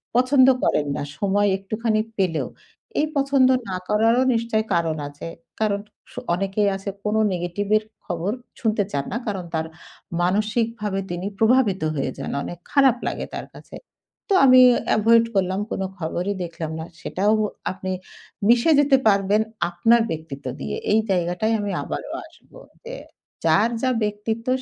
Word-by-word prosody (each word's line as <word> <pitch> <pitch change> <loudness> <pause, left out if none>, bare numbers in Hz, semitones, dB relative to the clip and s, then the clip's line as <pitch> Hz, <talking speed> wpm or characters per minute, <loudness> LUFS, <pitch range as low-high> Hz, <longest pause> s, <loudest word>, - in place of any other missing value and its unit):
পছন্দ 255 +1 +5 0.2
করেন 145 -1 +2
না। - - -3 0.2
সময় 205 +1 +2
একটুখানি 215 +2 -1 0.2
পেলেও। 180 -5 0 0.5
এই 300 - +3
পছন্দ 275 -2 +4 0.2
না 185 - -2
করারও 225 +4 +3
নিশ্চই 230 -1 0
কারণ 165 -2 0
আছে। 145 +3 -9 0.3
কারণ 210 -2 +1 0.3
স - - -17 0.2
অনেকেই 195 +3 0
আছে 195 +1 -5
কোন 210 +1 0 0.2
নেগেটিভের 205 +5 0 0.2
খবর 175 +4 -2 0.3
শুনতে 215 -2 +1
চান 140 -1 -2
না। 230 - -1
কারণ 190 -4 -3
তার 160 0 0 0.6
মানসিকভাবে 210 +2 0
তিনি 175 +2 -3
প্রভাবিত 225 -5 +3
হয়ে 135 -2 -1
যান। - - -5
অনেক 175 - -6
খারাপ 270 -4 +4
লাগে - - -3
তার - - -6
কাছে। - - -12 0.6
তো - - +5
আমি 255 -1 +8 0.4
avoid 230 +2 +5
করলাম 190 0 +1
কোন - - -2 0.2
খবরই 175 +4 -2
দেখলাম 165 -2 -5
না। 160 - -5 0.2
সেটাও 205 +3 +1 0.4
আপনি 185 0 -5 0.6
মিশে 240 +7 +5
যেতে 275 -2 +5
পারবেন 200 +1 +3 0.3
আপনার 225 +7 +3
ব্যক্তিত্ব 155 -4 -6
দিয়ে। 70 0 -4 0.2
এই 220 - +5
জায়গাটায় 180 +4 0
আমি 205 -1 -2
আবারও - - -5
আসব। - - -22 0.3
যে - - -7 0.5
যার 220 +4 +4
যা 260 - +2
ব্যক্তিত্ব 210 +3 -3
205 Hz, 145 wpm, -23 LUFS, 180-230 Hz, 0.6 s, আমি